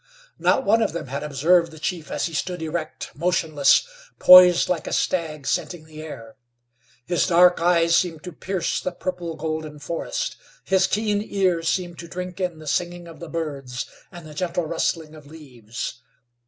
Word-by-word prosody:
Not 270 Hz, -, +2 dB
one 225 Hz, +3 st, +4 dB
of 160 Hz, -, 0 dB
them 170 Hz, -, -4 dB
had 140 Hz, +2 st, -4 dB
observed 165 Hz, +4 st, +2 dB
the 160 Hz, -, -13 dB
chief 160 Hz, -1 st, -4 dB
as -, -, -1 dB
he 165 Hz, -, -5 dB
stood 175 Hz, +1 st, -3 dB
erect, 160 Hz, 0 st, -5 dB
motionless, 160 Hz, -, +2 dB, 0.3 s
poised 180 Hz, -1 st, +8 dB
like 175 Hz, -4 st, -2 dB
a -, -, -3 dB
stag 155 Hz, -5 st, -1 dB
scenting 165 Hz, +1 st, -2 dB
the 155 Hz, -1 st, -11 dB
air. 115 Hz, -8 st, -10 dB, 0.7 s
His 175 Hz, +6 st, +1 dB
dark 180 Hz, -1 st, +5 dB
eyes 170 Hz, -1 st, +4 dB
seemed 165 Hz, -3 st, 0 dB
to 180 Hz, -, -7 dB
pierce 185 Hz, +3 st, -2 dB
the 185 Hz, -, -3 dB
purple 175 Hz, -2 st, -4 dB
golden 155 Hz, -1 st, -4 dB
forest, 170 Hz, -, -4 dB, 0.3 s
his 190 Hz, 0 st, +3 dB
keen 210 Hz, -1 st, 0 dB
ear 185 Hz, -5 st, +1 dB
seemed 175 Hz, +1 st, -2 dB
to 170 Hz, -, -8 dB
drink 180 Hz, +1 st, -6 dB
in 180 Hz, -3 st, -2 dB
the 155 Hz, -, -12 dB
singing 175 Hz, +3 st, -2 dB
of 165 Hz, -, -12 dB
the 170 Hz, -, -8 dB
birds 140 Hz, -6 st, -4 dB, 0.3 s
and 175 Hz, -3 st, -11 dB
the 155 Hz, -, -10 dB
gentle 170 Hz, +1 st, -2 dB
rustling 160 Hz, -1 st, -2 dB
of 150 Hz, -2 st, -14 dB
leaves. 125 Hz, -6 st, -8 dB
170 Hz, 175 wpm, -23 LUFS, 155-180 Hz, 0.7 s, poised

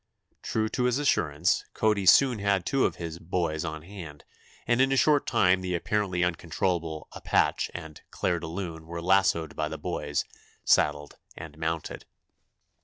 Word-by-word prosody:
True 110 Hz, -1 st, -1 dB
to 125 Hz, -, -1 dB
his 125 Hz, 0 st, +2 dB
assurance, 85 Hz, -, +1 dB
Cody 105 Hz, -3 st, +1 dB
soon 125 Hz, +2 st, +6 dB
had 100 Hz, -3 st, +1 dB
two 135 Hz, -1 st, +2 dB
of -, -, -6 dB
his 85 Hz, -1 st, -6 dB
"boys" 80 Hz, -2 st, -2 dB
on 80 Hz, -2 st, -5 dB
hand, 85 Hz, -6 st, -10 dB, 0.4 s
and 120 Hz, +1 st, +2 dB
in 135 Hz, 0 st, +3 dB
a 135 Hz, -, +2 dB
short 145 Hz, +1 st, +3 dB
time 95 Hz, -5 st, +3 dB
the 90 Hz, -1 st, -2 dB
apparently 95 Hz, 0 st, 0 dB
uncontrollable 85 Hz, -1 st, -2 dB
"Appach" -, -, +1 dB
and 80 Hz, -3 st, -8 dB
"Clair 85 Hz, -, -1 dB
de 80 Hz, -, -6 dB
Lune" 80 Hz, -2 st, -6 dB
were 85 Hz, 0 st, -5 dB
lassoed 85 Hz, -3 st, +2 dB
by -, -, -2 dB
the -, -, -5 dB
"boys," 75 Hz, 0 st, -2 dB, 0.4 s
saddled 75 Hz, 0 st, +2 dB, 0.2 s
and 80 Hz, -3 st, -9 dB
mounted. 80 Hz, 0 st, -4 dB
85 Hz, 160 wpm, -27 LUFS, 80-100 Hz, 0.4 s, soon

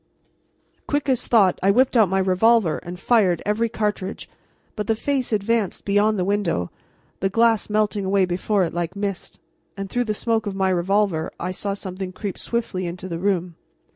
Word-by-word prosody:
Quick 290 Hz, -1 st, -1 dB
as 255 Hz, -2 st, +1 dB
thought 200 Hz, -6 st, +4 dB
I 195 Hz, -, +3 dB
whipped 255 Hz, +6 st, +3 dB
out 220 Hz, -6 st, +5 dB
my 190 Hz, -, +1 dB
revolver 190 Hz, -1 st, +3 dB
and 175 Hz, +1 st, -8 dB
fired 195 Hz, -7 st, +3 dB
every 225 Hz, +3 st, +1 dB
cartridge, 210 Hz, -3 st, -3 dB, 0.5 s
but 210 Hz, -2 st, -4 dB
the 225 Hz, -, +2 dB
face 265 Hz, +1 st, -1 dB
advanced 215 Hz, -1 st, 0 dB
beyond 205 Hz, +2 st, +2 dB
the 180 Hz, -, 0 dB
window, 195 Hz, -, -1 dB, 0.5 s
the 195 Hz, -, 0 dB
glass 225 Hz, +1 st, +2 dB
melting 210 Hz, -1 st, +1 dB
away 190 Hz, 0 st, +2 dB
before 185 Hz, +3 st, 0 dB
it 170 Hz, -, -2 dB
like 175 Hz, +2 st, -3 dB
mist, 200 Hz, -2 st, -4 dB, 0.4 s
and 195 Hz, -1 st, -5 dB
through 245 Hz, 0 st, 0 dB
the 215 Hz, -1 st, -2 dB
smoke 225 Hz, -1 st, -1 dB
of 195 Hz, -, -3 dB
my 190 Hz, -1 st, +1 dB
revolver 185 Hz, -2 st, +1 dB
I 180 Hz, -, -3 dB
saw 195 Hz, +2 st, -3 dB
something 185 Hz, -1 st, -6 dB
creep 200 Hz, 0 st, -5 dB
swiftly 215 Hz, -6 st, -2 dB
into 180 Hz, +2 st, -6 dB
the 170 Hz, -2 st, -4 dB
room. 180 Hz, -3 st, -1 dB
200 Hz, 180 wpm, -22 LUFS, 185-220 Hz, 0.5 s, out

